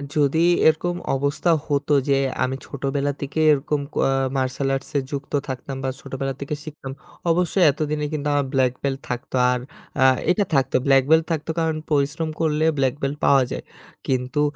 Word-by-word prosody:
যদি 150 +1 +2 0.3
এরকম 175 +3 +2 0.2
অবস্থা 140 +5 +1 0.2
হতো 145 0 0 0.2
যে 135 - +4 0.3
আমি 130 +1 -1
ছোটোবেলা 140 +1 -2
থেকে 140 +3 -3
এরকম 145 +1 -1
ক - - -20
আ - - +2 0.3
মার্শাল 130 +1 -1
আর্টসে 135 +1 -2
যুক্ত 140 +1 -5
থাকতাম 130 +1 -5
বা 130 - 0
ছোটোবেলা 135 0 -4
থেকে 145 +2 -3
শিখতাম, 145 -4 -8 0.4
অবশ্যই 180 +2 +2
এতদিনে 150 +1 -2
কিন্তু 150 -1 -2
আমার 140 -2 +1
ব্ল্যাক 130 -2 +2
বেল্ট 135 -1 0
থাকতো। 125 +1 -4 0.2
আর 125 - 0 0.4
আ - - +6 0.3
এইটা 200 +2 +3
থাকতো। 135 -1 +1
ব্ল্যাক 135 -1 +5
বেল্ট 160 0 +5
থাকতো 160 0 -2
কারণ, 160 -1 0
পরিশ্রম 150 +3 +1
করলে 155 0 +1
ব্ল্যাক 135 -1 +1
বেল্ট 140 +2 -2
পাওয়া 135 -2 +5
যায়। - - -4 0.4
কিন্তু 130 +3 0
140 Hz, 170 wpm, -22 LUFS, 135-155 Hz, 0.4 s, আ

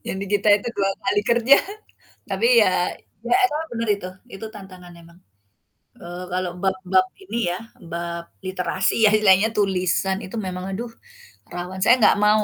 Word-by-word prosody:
Yang - - -3
di 200 - -4
kita 205 +1 +2
itu 210 - -5
2 195 -1 +1
kali 205 - +2
kerja 240 +4 +6 0.7
tapi 465 - +1
ya, - - +4 0.6
ya - - +2
emang 310 -2 -2
bener 230 -1 -3
itu, 185 -2 -8 0.3
itu 195 +3 -7
tantangan 185 -3 -12
emang. 170 +1 -18 0.8
Eee, 175 +1 -7
kalau 180 -1 -2
bab-bab 190 -1 +1 0.2
ini 235 - -4
ya 180 - -3 0.3
bab 170 0 -4 0.2
literasi 185 +1 -1
ya - - +7
istilahnya 210 0 +4
tulisan 190 -1 +1
itu 190 - -9
memang 180 0 -5
aduh 230 +4 -5 0.6
rawan. 180 +2 -6
Saya 240 +4 +6
nggak - - +6
mau 215 0 +4
190 Hz, 160 wpm, -22 LUFS, 180-215 Hz, 0.8 s, ya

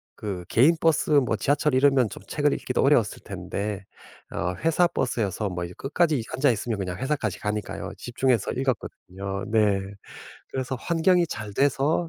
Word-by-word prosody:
그 95 -4 -5
개인 145 +9 +5
버스 165 -2 +2
뭐 135 -6 +4
지하철 145 +1 +1
이러면 130 -3 +4
좀 - - -10
책을 - - +1
읽기도 - - -1
어려웠을 - - +3
텐데 100 -1 -4 0.5
어 90 +2 -2
회사 165 +2 +4
버스여서 110 - -1
뭐 90 -1 -3
이 85 - -9
끝까지 150 -2 +1
앉아 130 +1 +3
있으면 115 0 -2
그냥 90 -2 -3
회사까지 130 -6 -2
가니까요. 105 0 -3
집중해서 120 -2 0
읽었거든요. 100 -6 -3
네. 105 -3 +3 0.7
그래서 130 0 -2
환경이 170 +5 +2
잘 105 -3 -6
돼서 145 +6 +2
125 Hz, 350 characters per minute, -25 LUFS, 100-145 Hz, 0.7 s, 개인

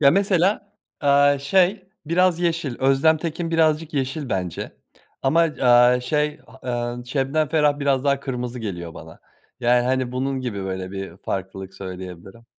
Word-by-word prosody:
Ya 140 -2 +6
mesela, 195 +1 +1 0.3
aaa, 145 0 +4
şey 185 +6 +1 0.2
biraz 175 +1 +2
yeşil, 165 -7 -1
Özlem 135 +4 +4
Tekin 165 +1 -4
birazcık 160 -1 +1
yeşil 135 +1 -2
bence 90 -5 -3 0.5
ama, 140 +5 +3
aaa, 125 -6 +4
şey, 150 +4 -1 0.3
eee, 120 -1 -2
Şebnem 140 +3 0
Ferah 150 -2 +2
biraz 140 -2 +1
daha 140 -1 +2
kırmızı 125 -2 -4
geliyor 85 -6 -6
bana. 80 0 -12 0.4
Yani 120 0 +3
hani 130 -1 0
bunun 130 +1 -2
gibi 110 -6 -4
böyle 95 -1 -4
bir 95 -3 -7
farklılık 95 0 -5
söyleyebilirim. 95 +3 -9
135 Hz, 145 wpm, -22 LUFS, 120-155 Hz, 0.5 s, Ya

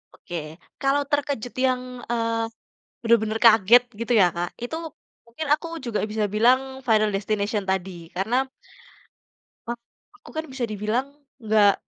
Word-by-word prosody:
Oke. 175 - -9 0.5
Kalau 275 +1 +2
terkejut 285 -5 -1
yang, 255 -1 +2 0.3
eee, 230 -1 0 0.6
benar-benar 225 -1 +2
kaget, 225 +1 +7 0.2
gitu 235 +1 -1
ya 185 -5 +6
Kak, 175 +1 -3
itu, 280 +7 -3 0.5
mungkin 265 +7 -6
aku 330 - -5 0.2
juga 235 -4 -2
bisa 215 -1 0
bilang 240 +5 +5 0.3
"Final 215 -2 +4
Destination" 205 +1 -1
tadi, 185 -3 -2
karena 240 +8 +1 1.2
a - - +1 0.4
aku, - - -16
kan, 315 +1 -2
bisa 260 -2 -3
dibilang, 215 +6 -1 0.4
enggak, 210 -2 +5
225 Hz, 130 wpm, -24 LUFS, 210-250 Hz, 1.2 s, kaget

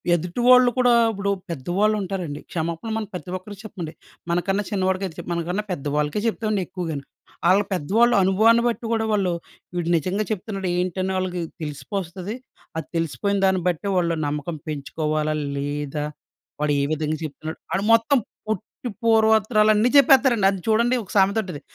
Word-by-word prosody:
ఎదుటివాళ్ళు 245 +9 +4
కూడా 250 -1 +5 0.2
ఇప్పుడు 200 -1 -1 0.2
పెద్దవాళ్ళు 175 +8 0
ఉంటారండి, 180 -6 -4
క్షమాపణలు 170 +6 -3
మనం 220 -1 -3
ప్రతి 180 0 -6
ఒక్కరికి 195 +1 -11
చెప్పండి. 170 -6 -6 0.4
మనకన్నా 195 +4 0
చిన్నవాడికై 190 -1 0
చేప్ - - -7
మనకన్నా 175 +4 -2
పెద్దవాళ్ళకే 150 +4 -1
చెప్తామండి 215 -2 0
ఎక్కువగాను. 160 -6 -4 0.5
ఆళ్ళ 195 +2 +5
పెద్దవాళ్ళు 220 +9 +3
అనుభవాన్ని 220 +5 +4
బట్టి 235 0 -2
కూడా 220 -1 +1
వాళ్ళు, 190 -4 +1 0.4
వీడు 175 -1 -1
నిజంగా 185 +6 -1
చెప్తున్నాడు 195 -2 -3
ఏంటని 185 +1 -1
వాళ్ళకి 180 -1 -2 0.2
తెలిసిపోస్తది. 175 - -5 0.4
అది 160 - -4
తెలిసిపోయిన 200 +5 -1
దాన్ని 190 -1 +2
బట్టే, 175 +3 -3
వాళ్ళు 170 -2 +1
నమ్మకం 150 +3 -3
పెంచుకోవాలా 155 +1 -2 0.2
లేదా 145 +1 -3 0.6
వాడు 150 -1 +2
ఏ - - +1
విధంగా 155 0 -1
చెప్తున్నాడు. 155 +1 -6
వాడు 190 +2 0
మొత్తం 230 +5 +4 0.3
పొట్టి 220 +3 -4
పూర్వత్తరాలన్ని 220 0 +4
చెప్పేత్తరండి. 265 -6 +5
అది 195 - -4
చూడండి 235 +3 +3
ఒక 190 - -13
సామెత 195 +2 +4
ఉంటది, 180 -7 -7
190 Hz, 140 wpm, -23 LUFS, 160-215 Hz, 0.6 s, కూడా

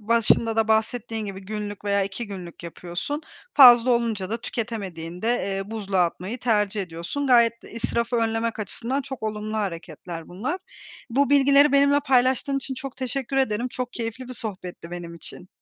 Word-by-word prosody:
başında 225 +1 +2
da 220 -1 +2
bahsettiğin 220 0 0
gibi 195 -1 -6
günlük 205 0 -6
veya 200 0 +2
2 195 +4 -4
günlük 180 -4 -8
yapıyorsun. 175 - -4 0.3
Fazla 245 -3 +9
olunca 225 -5 0
da 230 +1 -2
tüketemediğinde, 195 -6 -4 0.3
eee, 195 +2 -5
buzluğa 195 -4 +1
atmayı 185 +7 -4
tercih 210 -4 +1
ediyorsun. 175 +11 -4
Gayet 235 -3 +4
de - - -13
israfı 235 +1 -1
önlemek 225 0 0
açısından 235 +6 -2
çok 265 -3 -7
olumlu 215 0 -3
hareketler 170 -4 -5
bunlar. 240 - -3 0.5
Bu 275 +3 +2
bilgileri 280 0 +6
benimle 280 +1 +5
paylaştığın 265 +1 +2
için 270 -1 -3
çok 270 0 -7
teşekkür 265 +1 -3
ederim. 245 -2 +1
Çok 250 0 -5
keyifli 235 +2 -5
bir 255 - -6
sohbetti 185 -6 -7
benim 175 -1 -7
için. 175 +2 -10
225 Hz, 160 wpm, -24 LUFS, 195-250 Hz, 0.5 s, Fazla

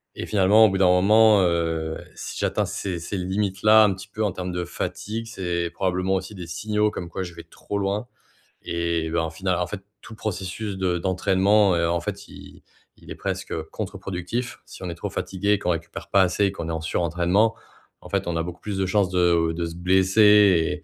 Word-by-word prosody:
et - - -5
finalement, 105 +1 +5
au - - +4
bout 95 - -1
d'un 95 - +5
moment, 105 +3 +5
heu, 80 -2 0 0.2
si - - -7
j'atteins - - 0
ces 95 -3 -4
ces 90 +4 -5
limites-là 100 +3 +3
un 100 - +2
petit 95 +1 -10
peu 110 +2 -4
en 105 - +1
termes 90 0 -5
de 90 0 -2
fatigue, 110 +6 -5
c'est 90 -5 -2
probablement 95 0 -1
aussi 95 +2 -4
des 90 -3 -8
signaux 105 +5 0
comme 85 -4 -6
quoi 95 - -4
je 90 -1 -8
vais - - -10
trop 100 - -6
loin 100 +4 -2 0.6
et 85 -1 -1
bah, 85 0 +1
au - - -3
final, 90 +2 -1
en 90 - 0
fait, 100 +2 -6 0.2
tout 110 - -11
processus 100 0 -4
de 90 -2 0
d'entraînement, 95 +2 +3
heu, 85 0 +1
en 85 0 0
fait, - - -6
il - - -14 0.3
il - - -17
est - - -5
presque - - -4 0.2
contreproductif. 105 +7 -5
Si - - -12
on 90 - -4
est 85 - -5
trop - - -5
fatigués, 100 +2 0
qu'on 90 - -2
récupère 85 0 -5
pas 100 - +4
assez 95 +3 +1
et - - -2
qu'on 90 -4 -6
est - - -2
en 80 - -3
surentraînement, 90 +7 +1 0.5
en - - -12
fait, - - -1
on 85 - -1
a 80 - 0
beaucoup 90 0 -7
plus 105 -2 -4
de 95 - +1
chances 95 0 +1
de 85 -2 +2
de 85 +1 -2
se 85 0 -6
blesser 95 0 +4
95 Hz, 215 wpm, -24 LUFS, 85-100 Hz, 0.6 s, finalement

